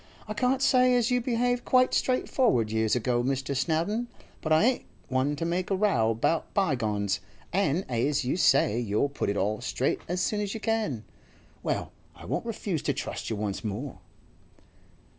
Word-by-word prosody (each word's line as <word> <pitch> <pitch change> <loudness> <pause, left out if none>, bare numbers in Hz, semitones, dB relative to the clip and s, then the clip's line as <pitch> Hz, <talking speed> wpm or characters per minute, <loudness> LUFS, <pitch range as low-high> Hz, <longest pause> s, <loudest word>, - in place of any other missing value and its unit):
'I 215 - -3
can't 250 +5 +1
say 255 -1 +5
as 240 0 +2
you 250 0 +2
behaved 245 0 0
quite 255 0 +3
straightforward 245 - +2
years 110 0 +1
ago, 120 0 +1
Mr. 135 +1 -1
Snowdon, 170 - 0 0.3
but 155 - -3
I 155 +3 +5
ain't 250 +2 +2 0.2
one 130 +3 +1
to 165 - -3
make 175 +2 -1
a 195 - +2
row 185 - +2
about 115 +9 0
bygones, 110 - 0 0.3
an' 185 -2 +1
as 130 +3 0
you 125 - 0
say 135 - +3
you'll 115 +4 0
put 140 - -2
it 100 - -1
all 105 +4 0
straight 130 +1 -1
as 180 +2 -1
soon 210 +3 0
as 205 0 -3
you - - -4
can, 215 - -1 0.6
well, - - -2 0.2
I - - -12
won't - - -3
refuse 200 -8 -2
to 145 -1 0
trust 135 - -5
you 110 - -1
once 105 0 -3
more. 110 +1 -5
150 Hz, 180 wpm, -28 LUFS, -, 0.6 s, say